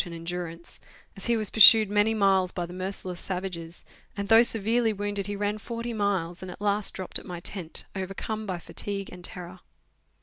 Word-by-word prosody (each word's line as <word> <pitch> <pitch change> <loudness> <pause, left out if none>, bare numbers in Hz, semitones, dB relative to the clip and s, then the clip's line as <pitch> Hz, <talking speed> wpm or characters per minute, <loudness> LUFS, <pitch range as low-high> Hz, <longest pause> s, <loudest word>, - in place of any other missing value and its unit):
and 175 -2 -8
endurance, 170 0 -6 0.4
as 195 - -5
he 235 -1 +3
was 215 -3 0
pursued 220 0 +9
many 210 +2 +3
miles 195 -3 +3
by 175 - -3
the 175 - -10
merciless 185 -1 -5
savages, 180 -3 -5 0.3
and, 200 0 -3
though 225 0 +8
severely 225 0 +2
wounded, 205 -1 -3
he 205 - -3
ran 205 +1 -2
forty 235 +2 -5
miles, 195 -5 -1
and 185 - -7
at - - -9
last 205 0 0
dropped 185 - -3
at - - -15
my 175 -2 -6
tent 175 -2 -5
overcome 195 +3 -4
by 185 -2 -2
fatigue 195 +3 -5
and 180 -1 -11
terror. 180 0 -7
195 Hz, 190 wpm, -27 LUFS, 180-210 Hz, 0.4 s, pursued